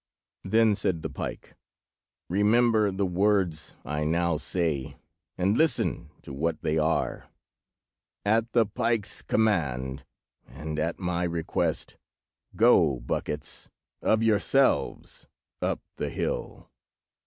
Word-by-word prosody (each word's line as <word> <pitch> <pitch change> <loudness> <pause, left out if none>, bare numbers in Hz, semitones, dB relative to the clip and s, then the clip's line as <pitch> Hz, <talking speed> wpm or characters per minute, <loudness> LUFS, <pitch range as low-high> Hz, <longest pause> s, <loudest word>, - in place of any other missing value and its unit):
Then 110 +2 +4
said 95 -5 -1
the - - -4
pike— - - -6 0.7
"Remember 110 +3 +3
the 95 +1 -1
words 90 -4 0
I 75 +2 -2
now 85 +1 +1
say, 80 -4 -2 0.4
and 95 +3 +2
listen 155 -3 +1
to - - -9
what 80 +5 -2
they 80 +1 +1
are: 80 +2 -1 1.0
'At 115 +3 +2
the 115 -2 +5
pike's 115 -1 -1
command, 70 - 0 0.4
and 75 +5 -6
at 80 +2 -1
my 90 -2 -2
request, 85 -2 -1 0.6
go, 85 - +4
buckets, 75 +4 -4 0.3
of 110 0 +2
yourselves 115 +5 +1 0.3
up - - -1 0.2
the - - -2
hill. - - -4
90 Hz, 110 wpm, -27 LUFS, 80-110 Hz, 1.0 s, the